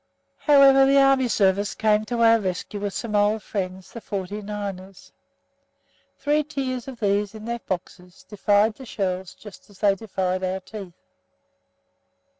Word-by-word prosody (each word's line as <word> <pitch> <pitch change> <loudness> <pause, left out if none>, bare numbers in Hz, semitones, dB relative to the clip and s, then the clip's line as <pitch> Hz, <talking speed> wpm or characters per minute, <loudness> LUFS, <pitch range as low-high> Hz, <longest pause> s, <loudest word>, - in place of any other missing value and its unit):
However, 275 -2 +6
the 275 +1 +4
Army 270 -2 +4
Service 200 -2 +1
came 215 -1 +2
to 235 +1 -1
our 230 0 +6
rescue 190 +1 -4
with 200 -1 -4
some 225 -3 -3
old 205 +1 +2
friends, 185 -2 -5
the 230 - -8
"forty 200 +1 -5
niners." 200 -2 -7 1.1
Three 295 +2 +1
tiers 265 -4 -4
of 260 -3 -8
these 205 0 0
in 215 0 -9
their 235 0 -3
boxes 180 -2 -7
defied 205 +1 +2
the 265 +4 -12
shells 185 -3 -3
just 210 -1 -14
as 200 - -18
they 200 -1 +3
defied 190 -2 -3
our 185 +1 -1
teeth. 190 -2 -10
210 Hz, 150 wpm, -24 LUFS, 190-235 Hz, 1.1 s, However